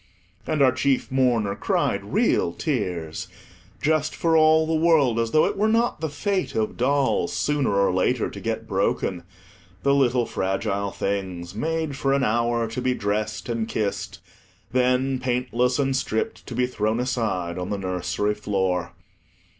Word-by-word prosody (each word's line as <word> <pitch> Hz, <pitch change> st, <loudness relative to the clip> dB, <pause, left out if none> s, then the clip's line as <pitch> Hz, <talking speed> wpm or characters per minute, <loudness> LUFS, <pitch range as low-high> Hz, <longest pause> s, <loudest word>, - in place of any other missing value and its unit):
And 155 Hz, -3 st, +2 dB
our 130 Hz, -, +6 dB
chief 130 Hz, +1 st, 0 dB
mourner 120 Hz, -6 st, +2 dB
cried -, -, 0 dB
real -, -, +2 dB
tears, 80 Hz, -3 st, -3 dB, 0.5 s
just 155 Hz, 0 st, +1 dB
for 165 Hz, -1 st, +1 dB
all 160 Hz, 0 st, +5 dB
the 160 Hz, -, -1 dB
world 155 Hz, -7 st, +3 dB
as 115 Hz, -1 st, 0 dB
though 155 Hz, -, +4 dB
it -, -, -1 dB
were 210 Hz, +2 st, +2 dB
not 230 Hz, -5 st, +1 dB
the 160 Hz, -, -1 dB
fate 195 Hz, +5 st, -2 dB
of 110 Hz, -1 st, -1 dB
dolls, 135 Hz, +2 st, +1 dB
sooner 145 Hz, -8 st, 0 dB
or 100 Hz, -2 st, +3 dB
later, 90 Hz, -, +1 dB
to -, -, -8 dB
get -, -, -3 dB
broken—the 90 Hz, +5 st, -2 dB
little 125 Hz, -3 st, +3 dB
fragile 100 Hz, +1 st, -1 dB
things, 95 Hz, -3 st, -3 dB
made 160 Hz, +5 st, -2 dB
for 135 Hz, -1 st, 0 dB
an 140 Hz, -1 st, +2 dB
hour, 115 Hz, 0 st, +1 dB
to 115 Hz, +3 st, -4 dB
be 125 Hz, 0 st, +1 dB
dressed 105 Hz, 0 st, -2 dB
and 115 Hz, -2 st, -2 dB
kissed; 105 Hz, -3 st, -3 dB, 0.5 s
then, 130 Hz, +1 st, +2 dB
paintless 125 Hz, 0 st, 0 dB
and 135 Hz, -2 st, +1 dB
stript, 110 Hz, -4 st, -2 dB
to 120 Hz, -, -6 dB
be 125 Hz, +1 st, +2 dB
thrown 110 Hz, -2 st, -1 dB
aside 110 Hz, -9 st, -1 dB
on 90 Hz, +1 st, -4 dB
the 105 Hz, -, -1 dB
nursery 95 Hz, +2 st, -1 dB
floor. 95 Hz, -4 st, -1 dB
120 Hz, 155 wpm, -24 LUFS, 100-140 Hz, 0.5 s, our